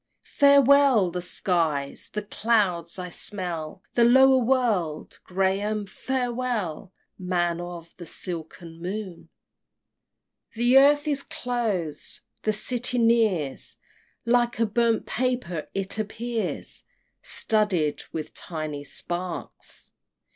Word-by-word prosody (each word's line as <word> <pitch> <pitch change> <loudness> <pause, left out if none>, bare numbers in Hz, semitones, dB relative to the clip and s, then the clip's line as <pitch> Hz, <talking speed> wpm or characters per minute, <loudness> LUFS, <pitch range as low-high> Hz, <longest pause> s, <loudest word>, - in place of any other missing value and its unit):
Farewell 280 -7 +5
the 180 +1 -3
skies! 165 -6 -1
the 210 - -3
clouds! 200 -6 0
I 180 -1 -5
smell 175 -2 -4
The 240 - +4
lower 265 +2 +6
world! 225 -11 0
Graham, 195 +3 0
farewell, 240 -7 -3 0.3
Man 175 -2 0
of 175 -1 -8
the 175 -2 -9
silken 165 -1 -7
moon! 185 -1 -6 1.2
XXXVI. - - -26
The 240 +3 +4
earth 290 +2 +4
is 285 -2 0
close! 215 - -3 0.2
the 215 - +1
City 245 +4 -1
nears 220 - +1 0.5
Like 240 0 +2
a 230 - +4
burnt 230 +1 +1
paper 245 -10 -2
it 195 +2 -1
appears, 225 +2 -3 0.4
Studded 200 -9 +2
with 155 -2 -5
tiny 155 -3 -5
sparks! 175 +4 -5
205 Hz, 105 wpm, -25 LUFS, 175-240 Hz, 1.2 s, lower